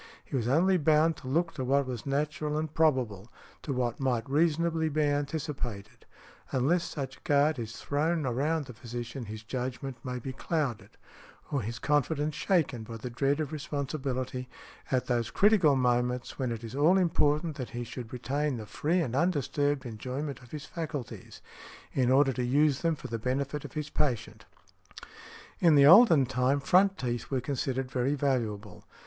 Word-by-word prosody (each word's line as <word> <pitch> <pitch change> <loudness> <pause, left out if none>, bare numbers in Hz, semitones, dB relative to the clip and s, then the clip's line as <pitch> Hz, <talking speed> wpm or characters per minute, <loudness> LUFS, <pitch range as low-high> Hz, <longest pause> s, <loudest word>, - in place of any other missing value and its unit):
He - - -5
was 120 -3 0
only 180 +8 +4
bound 155 +1 +3
to - - -10
look 165 +5 0
to 130 - -4
what 140 +2 +2
was 125 -1 -6
natural 150 +2 -1
and 155 -1 -3
probable, 125 -10 +1 0.3
to 150 - -4
what 125 -3 -1
might 125 -4 0
reasonably 160 +2 +1
be 155 +1 +1
anticipated. 145 -7 -3 0.4
Unless 150 +7 +2
such 135 -2 -6
guard 145 0 +3
is 115 -1 -5
thrown 155 +2 0
around 145 +5 0
the 125 - -10
physician 120 +2 -6
his 110 +1 -8
judgment 125 +1 -5
may 125 -1 -4
be 130 +2 -6
clouded, 140 -4 -2 0.6
or 140 - 0
his 115 +1 -5
confidence 150 +3 0
shaken 155 - +1
by 115 +1 -7
the 120 +3 -6
dread 140 +5 +1
of 155 -2 -2
responsibility, 135 -4 -3 0.4
at 130 -2 +1
those 120 -2 0
critical 195 -9 +4
moments 125 0 0
when 130 -3 -1
it 115 0 -5
is 115 0 -7
all 155 +7 +4
important 160 -3 +2
that 130 -4 -5
he 120 -2 -5
should 120 -1 -8
retain 140 +2 -1
the 110 - -7
free 165 - 0
and 125 -6 -2
undisturbed 145 -3 0
enjoyment 130 +6 -5
of 120 - -16
his 150 +1 -7
faculties, 155 -7 -6 0.5
in 125 -2 +2
order 135 +1 +4
to 125 - -2
use 140 +2 +2
them 165 -1 +1
for - - -14
the 115 0 -4
benefit 140 +4 -2
of - - -9
the 150 -1 -3
patient". 135 -7 -2 1.1
In 165 -3 +5
the 140 -1 +7
olden 170 - +8
time, 130 +2 +1
front 190 +7 +3
teeth 120 -3 -3
were 135 - 0
considered 130 0 -2
very 130 +3 0
valuable. 110 -8 -2
135 Hz, 170 wpm, -29 LUFS, 125-150 Hz, 1.1 s, olden